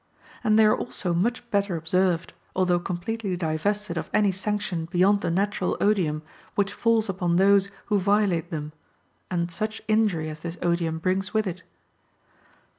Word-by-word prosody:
And 215 -2 +4
they 220 - +7
are 215 - +5
also 185 -7 -3
much 235 +8 0
better 200 -3 +1
observed, 170 +1 0 0.2
although 180 -2 +2
completely 185 +2 -3
divested 175 +3 -1
of - - -6
any 210 -2 +3
sanction 190 -3 -2
beyond 185 +4 +3
the - - -1
natural 195 +1 0
odium 170 -7 +1 0.3
which 200 -1 +1
falls 230 -1 +2
upon 180 -3 0
those 200 +1 +4 0.2
who 210 -2 +2
violate 195 -4 +2
them, 150 -3 -4 0.6
and 175 -1 -1
such 215 +4 -3
injury 215 -8 +2
as 155 0 -6
this 170 +2 -6
odium 170 -2 0
brings 185 +4 -1
with 215 0 +2
it. 180 -1 -4
185 Hz, 155 wpm, -25 LUFS, 170-210 Hz, 0.6 s, they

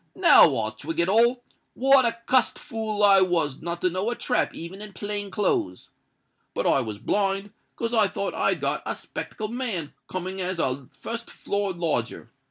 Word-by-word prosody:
now - - +6
I - - -1
twig 325 - -6
it 170 - +3
all. 235 +5 +3 0.3
What 270 0 +5
a 230 0 0
cussed 255 -1 +2
fool 220 -2 -3
I 195 -1 +7
was 170 -7 0
not 170 +1 -4
to 185 - +2
know 185 +5 -1
a 240 - -2
trap 245 - 0
even 175 +5 -8
in 210 -1 -9
plain 205 0 -3
clothes! 190 - -1 0.7
But - - -1
I 135 - +3
was 110 -4 -5
blind, 195 - 0 0.2
'cause 230 0 -3
I 220 -3 +5
thought 200 +1 -3
I'd - - 0
got - - 0
a - - -2
'spectable 215 -1 -6
man 225 - -3
coming 185 +1 -4
as 185 0 -2
a 130 -4 -1
fust 230 +12 -6
floor 200 -1 -2
lodger. 150 -9 -2
195 Hz, 180 wpm, -25 LUFS, 170-225 Hz, 0.7 s, I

